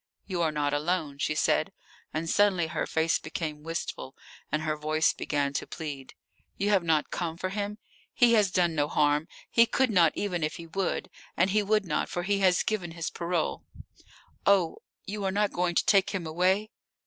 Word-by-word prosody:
"You 180 Hz, -3 st, -2 dB
are 160 Hz, -2 st, +2 dB
not 145 Hz, -1 st, -1 dB
alone," 150 Hz, -1 st, -1 dB
she 155 Hz, -, 0 dB
said, 155 Hz, -, +2 dB, 0.4 s
and 160 Hz, +1 st, -3 dB
suddenly 190 Hz, -2 st, +3 dB
her 160 Hz, -, -3 dB
face 160 Hz, 0 st, +1 dB
became 155 Hz, -1 st, -5 dB
wistful 160 Hz, -4 st, -5 dB, 0.4 s
and 155 Hz, +1 st, 0 dB
her 155 Hz, -1 st, 0 dB
voice 155 Hz, +1 st, +1 dB
began 140 Hz, -1 st, -1 dB
to -, -, -3 dB
plead. 145 Hz, -5 st, -7 dB, 0.4 s
"You 200 Hz, +1 st, 0 dB
have 195 Hz, -2 st, +4 dB
not 160 Hz, -3 st, +1 dB
come 165 Hz, -2 st, -3 dB
for 185 Hz, +1 st, -3 dB
him? 205 Hz, +1 st, -3 dB, 0.3 s
He 240 Hz, -1 st, +4 dB
has 210 Hz, -4 st, +4 dB
done 175 Hz, -2 st, +2 dB
no 145 Hz, -2 st, +1 dB
harm. 150 Hz, +1 st, +2 dB, 0.2 s
He 230 Hz, 0 st, +5 dB
could 255 Hz, +1 st, +1 dB
not, 170 Hz, -6 st, +4 dB
even 180 Hz, -5 st, -2 dB
if 155 Hz, +1 st, -1 dB
he 170 Hz, -, -8 dB
would. 185 Hz, +3 st, -2 dB, 0.3 s
And 185 Hz, -, +3 dB
he 210 Hz, +1 st, +3 dB
would 210 Hz, 0 st, +1 dB
not, 150 Hz, -3 st, -1 dB
for 175 Hz, -, -3 dB
he 200 Hz, +2 st, +1 dB
has 185 Hz, -2 st, +3 dB
given 185 Hz, -7 st, -2 dB
his 165 Hz, -1 st, -4 dB
parole. 170 Hz, -1 st, -2 dB, 0.8 s
Oh, 190 Hz, -5 st, +3 dB, 0.3 s
you 205 Hz, +1 st, -4 dB
are 195 Hz, -, +1 dB
not 205 Hz, +1 st, +1 dB
going 175 Hz, -1 st, 0 dB
to -, -, +2 dB
take 195 Hz, -2 st, +4 dB
him 185 Hz, -4 st, -3 dB
away?" 185 Hz, +6 st, +1 dB
175 Hz, 195 wpm, -28 LUFS, 155-195 Hz, 0.8 s, He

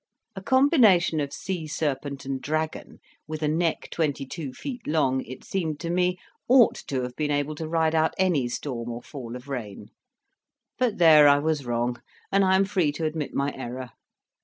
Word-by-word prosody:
A 195 Hz, -, -6 dB
combination 225 Hz, -, +4 dB
of 140 Hz, -1 st, -2 dB
sea 175 Hz, -4 st, -4 dB
serpent 140 Hz, -2 st, -3 dB
and 135 Hz, -1 st, -3 dB
dragon, 155 Hz, +2 st, -3 dB, 0.3 s
with 155 Hz, 0 st, -5 dB
a -, -, +2 dB
neck 165 Hz, +2 st, 0 dB
twenty 145 Hz, -4 st, -1 dB
two 145 Hz, 0 st, -6 dB
feet 250 Hz, -, -7 dB
long, 135 Hz, -4 st, +1 dB
it 130 Hz, -, -10 dB
seemed 160 Hz, -6 st, -3 dB
to 170 Hz, 0 st, -3 dB
me, 180 Hz, +1 st, +1 dB, 0.3 s
ought 250 Hz, -2 st, +6 dB
to 130 Hz, -2 st, -1 dB
have 125 Hz, 0 st, -6 dB
been 150 Hz, -1 st, -1 dB
able 145 Hz, +1 st, 0 dB
to 155 Hz, +1 st, -5 dB
ride 160 Hz, 0 st, +1 dB
out 160 Hz, 0 st, +2 dB
any 175 Hz, -9 st, +2 dB
storm 120 Hz, -1 st, -4 dB
or 120 Hz, +1 st, -6 dB
fall 125 Hz, -5 st, -8 dB
of 125 Hz, +2 st, -10 dB
rain; 120 Hz, -8 st, -6 dB, 0.9 s
but 240 Hz, -4 st, +1 dB
there 155 Hz, -4 st, +7 dB
I 140 Hz, 0 st, +6 dB
was 150 Hz, -3 st, -1 dB
wrong, 120 Hz, 0 st, -1 dB, 0.3 s
and 195 Hz, 0 st, +4 dB
I 190 Hz, 0 st, +4 dB
am 195 Hz, +1 st, +4 dB
free 185 Hz, -6 st, +1 dB
to 160 Hz, +2 st, -3 dB
admit 155 Hz, -3 st, -3 dB
my 140 Hz, +1 st, 0 dB
error. 125 Hz, -1 st, -6 dB
155 Hz, 185 wpm, -25 LUFS, 135-175 Hz, 0.9 s, there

